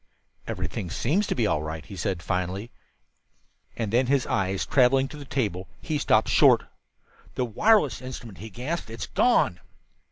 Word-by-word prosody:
"Everything 90 - -4
seems 155 - 0
to - - -1
be 120 - +1
all 75 -8 +1
right," 80 0 -6
he 100 - -9
said 95 -3 -2
finally; 95 +4 -2 1.1
and 110 -2 -3
then, 125 +2 +3
his 135 -1 +2
eyes 95 0 -1
traveling 135 0 +4
to 145 - -10
the 145 -1 -9
table, 105 -9 -2
he 155 -2 -2
stopped - - +3
short. - - +5 0.7
"The 125 - 0
wireless 150 - +3
instrument," 120 -5 -8
he 110 - -8
gasped. 130 - -4
"It's 115 -2 -5
gone!" 85 - +2
115 Hz, 160 wpm, -26 LUFS, 95-135 Hz, 1.1 s, short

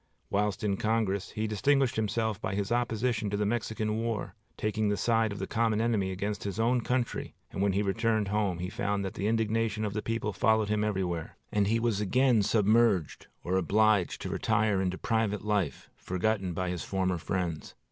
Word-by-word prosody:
Whilst 105 -1 0
in 100 -2 +1
Congress, 105 -3 0
he 110 - -3
distinguished 130 +4 +2
himself 110 -1 -1
by 95 +1 -2
his 100 +1 -2
opposition 115 -2 0
to 100 - -1
the 105 - 0
Mexican 110 -1 -1
War, 115 -2 -2 0.2
taking 110 0 0
the 105 - 0
side 115 +1 +2
of 100 - -5
the 95 - -3
common 110 -1 +1
enemy 110 -4 +1
against 100 +1 -3
his 100 +1 -4
own 120 +2 +2
country; 125 +1 -2 0.2
and - - -4
when 100 -1 +2
he 100 +2 +1
returned 110 +1 +1
home 100 -4 0
he 90 +1 -3
found 100 +1 -2
that 95 - -4
the 100 - -2
indignation 110 -1 0
of 100 - -3
the 105 - -2
people 115 -2 -2
followed 110 +2 +2
him 105 0 +1
everywhere, 95 -6 -2
and 100 -1 +2
he 115 +2 +2
was 115 -3 0
again 125 +2 +3
submerged 110 -4 +2 0.2
or 95 +2 0
obliged 105 +1 +2
to - - -3
retire 105 -3 +1
into 95 -1 -1
private 110 -3 -1
life, 105 -7 -1
forgotten 95 +1 -1
by 90 +1 -2
his 90 - -4
former 95 -2 -1
friends. 85 -3 -3
105 Hz, 190 wpm, -29 LUFS, 95-110 Hz, 0.2 s, again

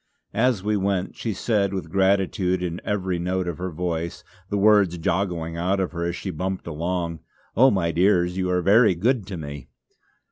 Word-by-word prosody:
As 115 -3 +1
we 105 +1 +1
went 95 -2 -1
she 115 - -3
said 100 -1 0
with 95 - -5
gratitude 95 -1 +1
in 85 0 -3
every 95 -3 -1
note 90 +1 -1
of 85 -1 -4
her 95 +1 -3
voice, 85 0 -3 0.3
the 100 - -1
words 100 -4 +4
joggling 85 -2 -1
out 95 +3 0
of 95 - -1
her 85 -1 -3
as 85 0 -2
she 95 - -5
bumped 95 +3 -3
along: 85 +1 -3 0.4
"Oh, 130 +5 +6
my 90 -7 +1
dears, 90 0 +2
you 95 -1 -1
are 90 -1 +1
very 105 0 +5
good 110 +3 0
to 95 -3 -5
me." 70 -4 -7
90 Hz, 185 wpm, -24 LUFS, 85-100 Hz, 0.4 s, Oh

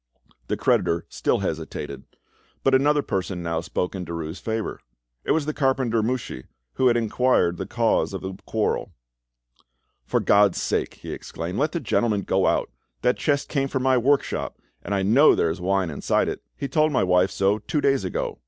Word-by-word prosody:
The - - -1
creditor 85 0 +1
still - - 0
hesitated, 70 -2 -4 0.6
but, 135 - +3
another 145 +2 +4
person 95 -2 -3
now 85 -1 -1
spoke 90 +1 -3
in 95 -2 -4
Derues' 85 0 -5
favour; 110 -1 -3 0.4
it - - -9
was 160 -2 +2
the 155 - -2
carpenter 130 -5 +1
Mouchy, 110 - -3 0.3
who 130 - +2
had 120 -1 +4
inquired 115 -6 +2
the - - -5
cause 115 -3 +1
of 95 - -5
the 95 0 -5
quarrel. 110 -1 -1 1.1
"For - - +1
God's 100 0 +4
sake," - - -1
he - - -9
exclaimed, 85 +3 -5
"let 150 +2 +1
the 170 - -2
gentleman 115 -6 +1
go 95 +1 +1
on. - - +2 0.4
That 125 - +3
chest 145 -2 0
came 135 -2 0
from 130 -1 -2
my 130 0 +4
workshop, 135 +3 +1 0.2
and 100 - -2
I 95 - 0
know 125 +10 +6
there 80 - +1
is 90 +3 -6
wine 95 -2 0
inside 70 - 0
it; - - -4 0.2
he - - -3
told 155 +3 +2
my 130 - +2
wife 90 0 +3
so 100 +2 +1
two 150 +8 -2
days 135 -6 +2
ago." 90 - -3
110 Hz, 185 wpm, -24 LUFS, 90-135 Hz, 1.1 s, know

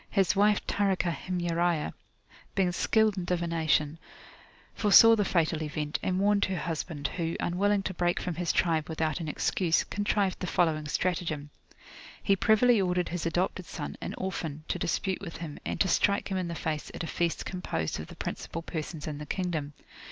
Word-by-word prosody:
His 195 -1 +2
wife 205 +1 +3
Tarikah 190 -4 +1
Himyariah, 175 -3 0 0.6
being 185 -2 +2
skilled 215 +3 +2
in 175 - -4
divination, 165 -3 +1 0.7
foresaw 225 +2 +7
the 210 - +2
fatal 165 -4 +1
event, 150 -1 -2
and 185 0 0
warned 200 0 +3
her 190 -1 -2
husband, 160 -4 -4
who, 165 0 -3
unwilling 200 +3 +1
to 190 - -3
break 175 0 +1
from 180 - -3
his 170 +1 0
tribe 160 -3 +1
without 160 0 -1
an 165 - -4
excuse, 165 +2 +1
contrived 205 -1 0
the 180 - -3
following 155 -4 +1
stratagem. 155 -3 -1 0.7
He 195 - +4
privily 220 +2 +4
ordered 180 -1 0
his 170 -1 -2
adopted 180 +1 -1
son, 145 - -5
an - - -4
orphan 160 -5 -4
[p.349]to - - -2
dispute 190 +2 -1
with 170 -4 -7
him, 160 -3 -7
and - - -3
to 190 - +4
strike 200 +2 +2
him 190 - 0
in 185 -2 -1
the 170 - -4
face 155 -2 -3
at - - -4
a - - -3
feast 170 -1 -1
composed 80 - -3
of 80 - -6
the - - -11
principal 165 - -5
persons 160 -2 -5
in 150 -2 -5
the 150 - -7
kingdom. 160 -6 -2
175 Hz, 180 wpm, -29 LUFS, 160-190 Hz, 0.7 s, foresaw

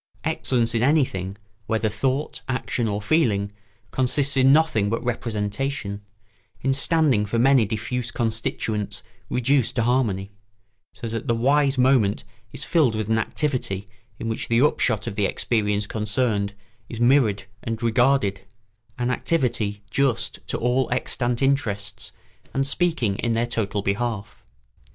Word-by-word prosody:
Excellence 120 -3 0
in 115 - +1
anything, 120 - +1 0.3
whether 110 0 +1
thought, 130 +7 -1
action, 125 -2 -1
or 105 0 -2
feeling, 105 -8 +2 0.4
consists 135 +2 +1
in 135 0 +5
nothing 140 -10 +3
but 115 - -2
representation, 110 -1 -2 0.6
in 135 - +1
standing 140 -5 +3
for 105 +3 -2
many 125 -2 +4
diffuse 115 +3 -3
constituents 110 -2 -2 0.3
reduced 125 0 +1
to 115 - +2
harmony, 110 -6 0 0.6
so 115 - -7
that 115 0 -4
the 115 - +2
wise 140 +3 +2
moment 125 -6 +3 0.3
is - - -6
filled 150 -10 +2
with 110 -1 -2
an 110 0 +3
activity 110 -6 -1 0.3
in 115 - -5
which 115 - -3
the 115 0 +2
upshot 120 -6 +2
of 115 -4 -4
the 105 -2 +2
experience 105 -3 0
concerned 105 -1 -1 0.3
is 115 - -6
mirrored 120 -5 +3 0.2
and 115 0 -4
regarded, 115 -4 +2 0.6
an 125 0 0
activity 115 -9 -1
just 125 -4 0
to - - -2
all 125 +2 +1
extant 125 0 0
interests 105 -7 -1 0.4
and 135 0 +2
speaking 140 - 0
in 120 -1 0
their 115 +1 +1
total 105 -4 -2
behalf. 105 +1 -3
115 Hz, 135 wpm, -24 LUFS, 105-130 Hz, 0.6 s, in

